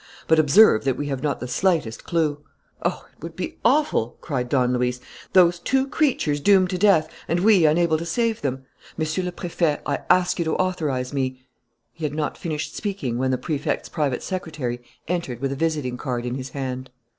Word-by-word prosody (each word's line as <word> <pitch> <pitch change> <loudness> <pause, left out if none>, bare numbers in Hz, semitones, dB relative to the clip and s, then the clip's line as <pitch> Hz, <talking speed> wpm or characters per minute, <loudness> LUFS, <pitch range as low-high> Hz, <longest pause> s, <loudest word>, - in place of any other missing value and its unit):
But 160 0 +5
observe 155 - +6
that 130 -2 +1
we 145 +1 -3
have 135 -2 -3
not 145 -1 -1
the 125 - -5
slightest 160 -6 0
clue." 155 -4 0 0.4
"Oh, - - -2
it - - -30
would 165 +1 -7
be 185 - -5
awful!" 265 - +2
cried 125 -6 -3
Don 125 -2 +2
Luis. 125 0 0 0.3
"Those 175 -2 +5
two 265 +9 +1
creatures 270 - +1
doomed 190 +2 +4
to 180 - -2
death; 180 -6 +4 0.2
and 170 +2 0
we 195 -5 +5
unable 160 0 +3
to 165 - -5
save 230 +5 0
them! 130 -1 -3 0.3
Monsieur 155 +3 -1
le 180 - -2
Préfet, 170 -4 -1
I 145 - -1
ask 180 -1 +3
you 170 - 0
to 160 - 0
authorize 150 -9 -1
me 130 -2 -2 0.2
" 120 -1 -50
He 165 - -11
had 150 -1 -2
not 155 -1 -2
finished 155 -3 -4
speaking 165 - -3
when 130 0 +1
the 130 - +1
Prefect's 150 +1 -2
private 140 -5 -1
secretary 155 -10 -4 0.3
entered 170 -9 -2
with 135 +1 -2
a - - -2
visiting 150 -5 -1
card 125 -2 -3
in 125 - -2
his 130 0 -5
hand. 130 -1 -5
155 Hz, 200 wpm, -23 LUFS, 130-175 Hz, 0.4 s, observe